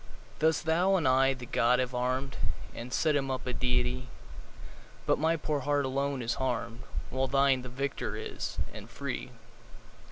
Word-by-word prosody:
Thus 160 +1 +3
thou 175 +5 +3
and 165 -7 +2
I 135 +1 +4
the 125 -1 -8
god 120 +1 +3
have 125 0 -1
arm'd 130 +2 -1 0.4
And 120 +2 -7
set 155 +2 +2
him 135 -1 +1
up 130 -1 -2
a 125 - -2
deity; 125 +1 0 1.0
But - - +2
my 160 +2 +3
poor 150 -1 -1
heart 145 0 +1
alone 135 0 -1
is 115 0 -1
harm'd, 120 -2 -1 0.3
15 130 - -5
Whilst 135 0 0
thine 135 -1 +4
the 125 - -7
victor 135 +2 -3
is, - - -5 0.2
and - - -9
free! - - -4
130 Hz, 170 wpm, -30 LUFS, 125-140 Hz, 1.0 s, I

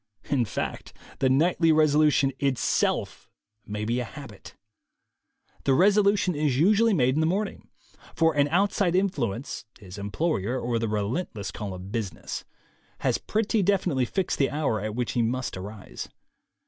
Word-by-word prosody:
In 130 -5 +2
fact, - - -5 0.3
the 130 - +3
nightly 165 +5 +3
resolu 155 -1 +4
tion 135 -1 +2
itself 135 -3 0 0.4
may 105 +1 -3
be 120 +3 0
a - - -1
habit. 120 -5 -11 1.1
The 135 - +3
resolution 200 +1 +4
is 145 -4 0
usu 205 +9 +4
ally 225 - +4
made 130 -7 +3
in 150 - 0
the 160 - +2
morning; 195 +4 -2 0.5
for 165 -1 +3
an 145 0 +3
outside 185 +1 +2
influence 140 - -1
(his 95 -1 -10
employer 120 - -1
or 120 -1 -1
the 115 - -1
relentless 105 - -2
call 100 -1 -5
of 90 +2 -9
business) 110 -5 -4 0.6
has - - +1
pretty 220 0 0
definitely 180 -9 +1
fixed 190 +8 -2
the 135 - +3
hour 145 -8 -1
at 105 0 -4
which 125 -1 -1
he 120 - +1
must 125 +3 -1
arise. 100 +2 -8
135 Hz, 155 wpm, -26 LUFS, 110-175 Hz, 1.1 s, resolu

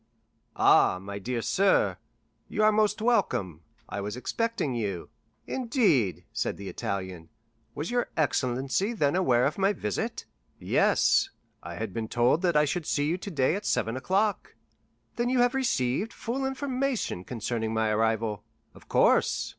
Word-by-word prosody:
"Ah, - - +5
my 100 +1 -7
dear 115 +3 -3
sir, 195 0 +2 0.5
you 215 - -1
are 215 - +6
most 215 0 +1
welcome; 100 - +1 0.3
I 100 - -4
was 105 +4 -5
expecting 230 - -2
you." 100 -7 -3 0.4
"Indeed," 225 - +1
said - - -2
the 100 -1 -7
Italian, 95 -4 -5 0.5
"was 150 +7 -4
your 245 0 0
excellency 135 - 0
then 150 -9 +1
aware 125 -10 +3
of 150 - -1
my 195 +2 +3
visit?" 105 - -3 0.3
"Yes; - - +3 0.3
I - - -8
had 110 -4 -5
been 110 +1 -3
told 120 +8 +2
that 175 -5 +2
I 150 - +5
should 165 +2 -3
see 145 - +1
you 170 +5 -1
today 155 -9 0
at 205 - -4
seven 115 -1 0
o'clock." 195 - -1 0.6
"Then 240 +1 0
you 255 - +1
have 245 0 +3
received 215 - 0
full 265 +3 -3
information 265 - -2
concerning 115 0 -3
my 110 -1 +1
arrival?" 110 -1 0 0.3
"Of - - -18
course." - - +3
140 Hz, 150 wpm, -27 LUFS, -, 0.6 s, are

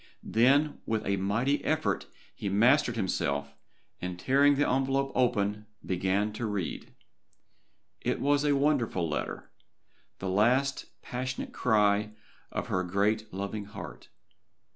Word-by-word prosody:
Then 140 +6 +3
with 110 -1 -1
a 100 0 +1
mighty 115 +9 0
effort 155 0 0 0.3
he 100 - -4
mastered 120 +5 +4
himself, 70 -8 -1 0.5
and 90 -1 -4
tearing 140 +8 +4
the 145 +1 +2
envelope 135 +1 +1
open 105 -4 +1 0.2
began 95 +3 0
to 110 +1 -3
read. 100 -5 -4 1.1
It - - -1
was 145 +1 +2
a 145 -1 +3
wonderful 135 - +1
letter. 75 - -4 0.7
The 95 - -5
last 125 +8 +2 0.2
passionate 130 +1 -4
cry 105 -2 +2 0.4
of - - -3
her 95 - 0
great 105 +4 0
loving 100 +2 -4
heart. 100 +1 -10
110 Hz, 120 wpm, -29 LUFS, 100-135 Hz, 1.1 s, mastered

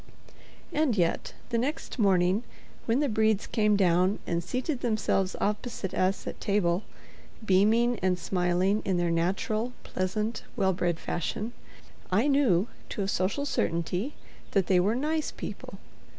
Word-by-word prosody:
And 290 -7 +2
yet, 170 -2 0
the 235 -1 +1
next 265 +1 -3
morning, 190 -1 +3 0.5
when 240 +5 +2
the 295 - +2
Bredes 220 -3 +2
came 210 -2 +2
down 185 +1 +3
and 170 0 -1
seated 255 - -2
themselves 215 -5 0
opposite 210 -1 -2
us 185 +1 0
at - - -6
table, 190 -3 +1 0.6
beaming 220 +5 +3
and 185 -1 +1
smiling 180 +3 +1
in 190 -3 0
their 175 -1 +1
natural, 195 +8 0
pleasant, 215 +4 -2
well 190 -5 +2
bred 175 -2 -1
fashion, 215 +7 -3 0.6
I 215 +9 +3
knew, 245 -10 +3 0.2
to 200 - -2
a - - -2
social 200 +9 0
certainty, 180 - -1 0.4
that 195 -3 +3
they 185 -1 +4
were 205 +5 +2
"nice" 305 +4 0
people. - - -7
200 Hz, 140 wpm, -28 LUFS, 180-230 Hz, 0.6 s, they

